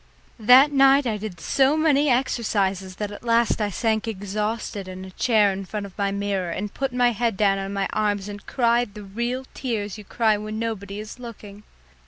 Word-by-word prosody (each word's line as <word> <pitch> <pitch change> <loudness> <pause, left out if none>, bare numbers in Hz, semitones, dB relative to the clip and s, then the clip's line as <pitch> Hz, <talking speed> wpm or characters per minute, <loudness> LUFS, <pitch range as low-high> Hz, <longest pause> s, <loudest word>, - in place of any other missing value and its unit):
That 255 +6 +7
night 275 0 +5
I 220 -3 -1
did 205 -5 -7
so 270 - +2
many 295 -2 +3
exercises 200 -7 0
that 210 +1 -4
at 205 - -9
last 230 -1 +2
I 210 - +1
sank 220 +2 -1
exhausted 210 0 -3
in 185 0 -8
a 190 - -10
chair 215 -1 +3
in 195 +1 -5
front 205 +2 -5
of 195 - -12
my 200 -1 0
mirror 200 -2 -2
and 200 +4 -4
put 270 -1 -2
my 245 0 +3
head 230 -2 -1
down 195 -1 +2
on 195 0 -4
my 200 -1 -1
arms 205 -2 0
and 205 0 -8
cried 235 -3 +1
the 210 - -8
real 235 +6 -3
tears 215 -6 -3
you - - -9
cry 215 0 +1
when 215 +1 -5
nobody 210 -3 -4
is 215 +3 -8
looking. 210 -4 -10
215 Hz, 200 wpm, -24 LUFS, 200-240 Hz, -, That